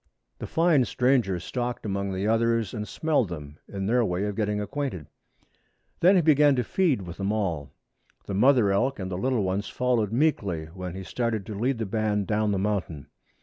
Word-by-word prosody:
The - - -5
fine 165 -5 +3
stranger 125 -9 +1
stalked 120 +7 -4
among 100 -1 -2
the 95 +2 -2
others 115 -1 +1
and 105 -2 -4
smelled 145 - 0
them, 75 -3 -8
in 95 -1 -4
their 120 +4 +3
way 90 -2 -1
of 105 -1 -3
getting 105 -1 -1
acquainted. 105 - -4 0.9
Then 185 +3 +5
he 180 - +4
began 150 -2 +5
to 125 - +1
feed 150 - +1
with 85 -1 -8
them 100 +1 -1
all. 85 -10 -2 0.6
The - - -5
mother 120 0 +4
elk 130 +8 +1
and 95 -1 -5
little 120 +4 0
ones 95 +2 -1
followed 120 -5 0
meekly 105 - 0
when 90 -1 -6
he 95 - -6
started 110 +2 -2
to 110 - -6
lead 120 +6 0
the 110 - -2
band 105 -1 0
down 105 +1 0
the 100 - 0
mountain. 95 -7 -3
105 Hz, 190 wpm, -26 LUFS, 95-125 Hz, 0.9 s, Then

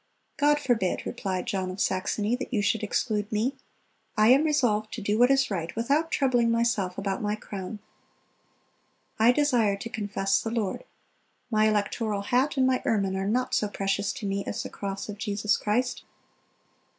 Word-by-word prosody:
"God 295 0 +4
forbid," 235 -10 0
replied 190 -6 -3
John 190 -5 -2
of 185 +2 -7
Saxony, 205 +5 0
"that 260 - -6
you 215 -5 +1
should 210 +2 +1
exclude 210 -1 -1
me. 225 +6 0 0.6
I 215 +1 +5
am 275 +5 +6
resolved 230 -8 +1
to - - -5
do 210 +2 0
what 245 +1 +6
is 270 -3 +3
right, 170 -3 -2
without 285 +8 +1
troubling 245 -6 +2
myself 230 -6 0
about 195 -1 -2
my 210 0 0
crown. 205 -1 -7 1.4
I 225 +2 +6
desire 245 -8 +2
to 215 +4 -6
confess 205 -3 0
the 225 - -3
Lord. 225 - -2 0.7
My 215 0 +4
electoral 210 0 0
hat 260 +7 +1
and 260 - +4
my 255 -1 +2
ermine 195 -4 +1
are 190 0 -2
not 250 +4 0
so 210 - +2
precious 200 0 -1
to 215 - -7
me 195 0 -1
as - - -3
the - - -6
cross 195 0 -5
of 205 -1 -7
Jesus 205 0 0
Christ." 245 +4 -1
215 Hz, 175 wpm, -27 LUFS, 200-245 Hz, 1.4 s, am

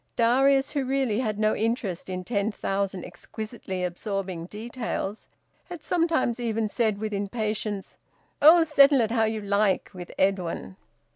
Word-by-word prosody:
Darius, 270 +4 +3
who 285 -2 -1
really 260 -4 0
had 215 -5 -1
no 215 0 +2
interest 215 -6 -2
in 185 0 -4
ten 205 +1 -1
thousand 195 -2 -2
exquisitely 215 -4 -6
absorbing 180 -1 -4
details, 220 -1 -5 0.4
had 350 -4 -9
sometimes 325 -9 +1
even 225 -2 -1
said, 215 -1 0
with 215 0 -4
impatience, 210 0 -3 0.4
"Oh! 330 +3 +8
Settle 280 -3 +5
it 225 -1 0
how 225 -2 +3
you 220 0 -2
like, 200 -1 +1
with 180 -1 -8
Edwin." 185 - -1
215 Hz, 140 wpm, -26 LUFS, 195-245 Hz, 0.4 s, Oh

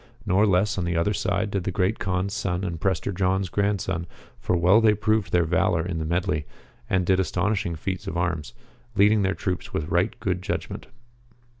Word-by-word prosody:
Nor 100 +2 +3
less 100 +2 +2
on 90 - -1
the 85 -1 -1
other 85 +6 +1
side 100 +1 -1
did 100 -2 -1
the 95 - -2
Great 95 +3 0
Kaan's 95 +1 -1
son 95 -3 -2
and 85 -4 -4
Prester 95 +1 0
John's 95 0 0
grandson, 95 -4 -1 0.3
for 90 - 0
well 90 +6 +5
they 110 -1 +5
proved 110 -3 0
their 85 -1 +3
valour 85 0 +1
in 85 -2 -3
the 80 - -2
medley, 80 -3 -1 0.4
and 95 -1 +1
did 95 +1 +3
astonishing 95 +1 0
feats 95 +3 -4
of 85 - -3
arms, 85 -4 -2 0.4
leading 105 +1 +5
their 95 -1 +1
troops 90 -1 -4
with 75 +1 -2
right 95 +7 0
good 90 -5 -1
judg - - -3
ment. - - -8
95 Hz, 195 wpm, -25 LUFS, 85-100 Hz, 0.4 s, well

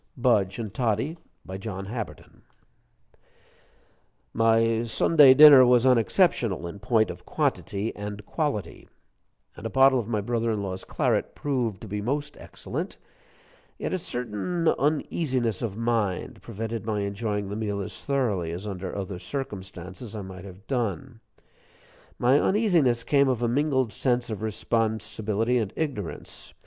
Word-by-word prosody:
BUDGE 105 -6 +2
AND 110 -4 -5
TODDIE 120 +8 -1 0.3
BY 95 - -6
JOHN 95 -2 -5
HABBERTON 115 +2 -7 1.9
My 115 0 +3
Sunday 135 +3 +6
dinner 145 -2 +10
was 125 0 +4
unexceptional 120 - +2
in 85 +4 -7
point 110 -2 +2
of - - -11
quantity 100 +3 -2
and 105 0 -7
quality, 145 - -3 0.7
and - - -11
a 115 - -3
bottle 135 0 +5
of 110 - -4
my 110 -3 0
brother 115 +2 -1
in 105 -2 -1
law's 95 -1 -5
claret - - 0
proved 120 -8 -2
to 110 - -8
be 105 +1 -3
most 145 +6 -2
excellent; - - -6 0.8
yet - - -3
a 185 - 0
certain 145 - -3
uneasiness 135 - 0
of 110 -4 -3
mind 115 -5 -1
prevented 115 0 -5
my 105 -2 -1
enjoying 100 0 -2
the 100 - -4
meal 105 -2 -2
as 100 - -6
thoroughly 115 -12 0
as 90 +4 -6
under 95 -2 -5
other 95 -2 -5
circumstances 100 -2 -7
I 105 - -5
might 95 0 -9
have 95 +2 -12
done. 120 -1 -3 1.0
My 130 +4 +4
uneasiness 170 - +2
came 140 +1 +3
of 120 -2 -1
a - - +2
mingled 130 -2 +1
sense 120 -2 0
of 110 - -5
responsibility 110 +1 -1
and 105 -4 -2
ignorance. 130 - -5
115 Hz, 140 wpm, -26 LUFS, 100-130 Hz, 1.9 s, dinner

